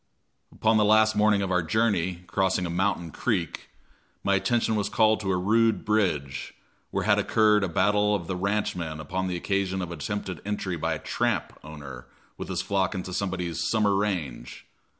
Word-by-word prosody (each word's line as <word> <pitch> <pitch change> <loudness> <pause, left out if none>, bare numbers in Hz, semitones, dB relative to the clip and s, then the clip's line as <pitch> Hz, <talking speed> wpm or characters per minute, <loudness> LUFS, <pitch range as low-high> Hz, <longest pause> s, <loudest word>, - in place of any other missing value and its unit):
Upon 110 0 +2
the 105 - +4
last 110 +1 +4
morning 105 -1 +3
of 95 - -2
our 90 -1 +3
journey, 90 -1 0
crossing 95 -1 0
a 85 - -3
mountain 90 -2 -1
creek, 90 - -2 0.5
my 100 - +2
attention 110 +3 +1
was 105 -1 -1
called 110 -1 +3
to 95 -3 -2
a 90 - +1
rude 110 +2 +2
bridge, 75 -11 -1 0.3
where - - -2
had - - +3
occurred 105 -2 +3
a 95 - 0
battle 105 +4 +2
of 90 -4 -4
the 95 - -3
ranchmen 90 -5 -2
upon 95 +5 -3
the 90 -1 -2
occasion 95 +1 -1
of 90 -2 -4
an 85 - -7
attempted 95 -2 -4
entry 100 -3 -3
by 80 - -1
a - - -4
"tramp" - - -1
owner 70 -5 -9 0.3
with - - -7
his - - -2
flock 95 0 0
into 90 -1 -5
somebody's 90 -4 -2
"summer 105 -3 +2
range." 85 -12 -3
95 Hz, 180 wpm, -26 LUFS, 85-105 Hz, 0.5 s, the